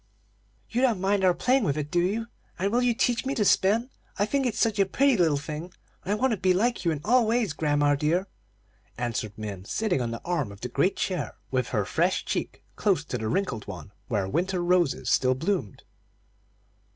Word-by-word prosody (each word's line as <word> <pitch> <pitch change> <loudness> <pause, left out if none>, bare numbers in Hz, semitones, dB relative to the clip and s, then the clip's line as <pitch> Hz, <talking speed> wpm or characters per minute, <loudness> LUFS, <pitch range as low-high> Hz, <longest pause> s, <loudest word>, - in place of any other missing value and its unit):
"You 240 - -1
don't 240 -7 +2
mind 195 +1 +1
our 185 - +6
playing 255 0 +2
with 145 -6 0
it, 150 0 -4
do 175 - +2
you? 210 +6 0 0.3
And 195 +3 0
will 240 +2 +2
you 245 -2 +2
teach 240 0 +1
me 270 +1 -2
to 210 - +1
spin? 220 +7 +3 0.3
I 205 - +2
think 270 +3 0
it's 235 - -3
such 220 -3 +2
a 195 - +5
pretty 275 +6 +3
little 165 -7 +3
thing, 155 +4 -6 0.3
and 195 - -3
I - - +3
want 260 +4 +1
to 220 - 0
be 185 0 +2
like 235 +4 +1
you 170 - +2
in 155 -3 -2
all 240 +1 +4
ways, 225 -6 +1
grandma 145 -1 +2
dear," 155 +6 +1 0.7
answered 115 -3 -3
Min, 105 -4 -6
sitting 195 - 0
on 120 - -1
the 115 - -5
arm 165 -11 -1
of 100 - -13
the 125 - -4
great 180 +8 +1
chair, 180 -6 -2 0.2
with 130 -2 0
her 105 -5 -1
fresh 170 - 0
cheek - - -3
close 185 -7 +1
to 125 - -4
the 110 - -3
wrinkled 125 - -2
one 90 -4 -8 0.2
where 100 -5 -1
winter 180 - -1
roses 175 -5 +1
still 130 0 +3
bloomed. 150 - -2
180 Hz, 210 wpm, -26 LUFS, 140-215 Hz, 0.7 s, our